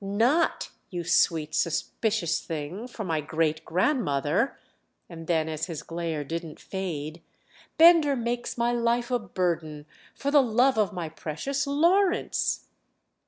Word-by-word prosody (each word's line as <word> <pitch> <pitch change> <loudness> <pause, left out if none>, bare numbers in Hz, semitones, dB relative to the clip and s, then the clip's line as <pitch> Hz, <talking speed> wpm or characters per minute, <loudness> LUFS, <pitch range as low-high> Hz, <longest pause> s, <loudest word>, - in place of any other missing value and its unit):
"Not, 235 +12 +1 0.2
you 175 -2 -4
sweet 165 -2 +2
suspicious 170 +1 0
thing, 165 +9 -5
for 240 -3 -7
my 160 -5 -1
great 160 +1 -1
grandmother!" 180 - 0 0.5
And 165 -2 -10
then 160 -2 +1
as 155 +1 -3
his 165 -4 -6
glare 165 -3 -3
didn't 165 +1 -6
fade: 165 -4 -5 0.6
"Bender 325 -4 +7
makes 240 0 -3
my 235 0 +1
life 235 +1 0
a 245 - +2
burden—for 170 - -4
the 290 -1 +7
love 250 0 +3
of 210 -2 +2
my 175 -4 -4
precious 165 - -3
Lawrence." 350 +7 +2
180 Hz, 125 wpm, -27 LUFS, 160-245 Hz, 0.6 s, Bender